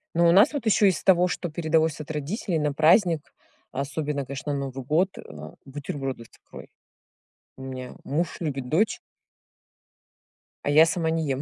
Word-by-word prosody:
Ну, 170 0 +4
у - - +6
нас 200 - +6
вот 285 -5 -4
ещё 215 -1 +4
из 190 - 0
того, 180 -2 +5
что 180 -1 -3
передалось 160 -1 0
от 155 +1 -7
родителей 160 - -2
на 150 -1 0
праздник, 160 +1 +3 0.4
особенно, 140 +1 -3
конечно, 140 +2 -5
на 140 - -2
Новый 135 -1 -5
год, 170 +8 +1
э, - - -7
а, 75 0 -10
бутерброды 135 -3 -5
с - - -17
икрой. - - -13 0.9
У - - -11
меня 130 -1 -7
муж 165 +5 -2
любит, 140 -6 -3
дочь. 195 - +1 1.7
А - - -1
я 155 +3 +7
сама 165 -1 -1
не 160 0 0
ем. 135 -1 -1
155 Hz, 175 wpm, -25 LUFS, 140-170 Hz, 1.7 s, я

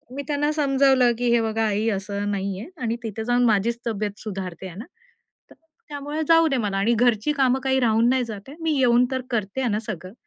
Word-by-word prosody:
मी 285 - -4
त्यांना 295 0 0
समजावलं, 270 -4 +3
की 245 0 0
"हे 235 - +3
बघा 225 0 0
आई 210 +1 0
असं 200 0 -3
नाहीये 195 +2 -3 0.2
आणि 230 0 0
तिथे 220 0 -4
जाऊन 245 +1 +2
माझीच 230 +2 +1
तब्येत 210 -2 -3
सुधारते 190 -3 -6
आहे 175 - -10
ना 220 - -7 0.7
तर - - -15 0.3
त्यामुळे 290 +1 -4
जाऊ 330 0 +5
दे 270 - +1
मला 205 -4 -1
आणि 210 +5 +2
घरची 235 +2 +2
कामं 265 -2 +2
काही 265 0 +2
राहून 230 0 +3
नाही 260 0 +2
जात 215 +1 -9
आहे. 290 - -11
मी 325 -1 0
येऊन 245 -1 +4
तर 260 0 -1
करते 215 +2 -2
आहे 250 - 0
ना 210 - 0
सगळं. 190 -5 -7
230 Hz, 215 wpm, -23 LUFS, 205-265 Hz, 0.7 s, जाऊ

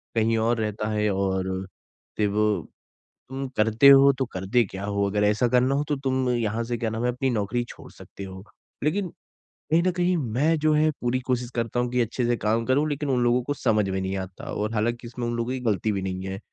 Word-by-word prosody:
कहीं 115 0 +2
और 115 +1 +1
रहता 105 0 -2
है 105 0 +1
और 95 -1 -1 0.7
फिर 105 - +2
वो 105 +1 +1 0.8
तुम 135 +1 -4
करते 110 +5 +5
हो 140 0 +8
तो 130 - +1
करते 95 +6 +1
क्या 95 0 -7
हो? 100 0 0
अगर 105 0 +1
ऐसा 105 +4 +2
करना 125 +2 +3
हो 145 - 0
तो 145 - 0
तुम 130 -1 +1
यहाँ 115 -2 0
से, 120 +1 -2
क्या 115 -1 -1
नाम 115 +2 -3
है, 125 - +2
अपनी 130 +2 -1
नौकरी 120 +2 -1
छोड़ - - -12
सकते 100 - -11
हो।" 95 0 -9 0.4
लेकिन, 180 +5 0 0.6
कहीं 165 +2 +4
ना 185 - +2
कहीं 180 +1 +2
मैं 145 +5 +1
जो 155 0 +3
है 155 +1 +3
पूरी 125 +1 0
कोशिश 125 -1 0
करता 115 0 -1
हूँ 125 0 0
कि 125 0 +2
अच्छे 120 +2 -1
से 120 0 +2
काम 115 +2 0
करूँ 140 +5 +2
लेकिन 145 0 -2
उन 125 -2 +2
लोगों 120 +1 +3
को - - +2
समझ 105 -7 +1
में 95 0 -1
नहीं 95 +1 -2
आता 95 -1 -7
और 105 +2 -2
हालाँकि, 120 +2 -1
इसमें 120 0 -4
उन 120 - -2
लोगों 115 +1 -2
की 130 - -3
गलती 105 +1 0
भी 100 -2 -2
नहीं 95 0 -4
है। 95 0 -5
120 Hz, 230 wpm, -25 LUFS, 105-130 Hz, 0.8 s, हो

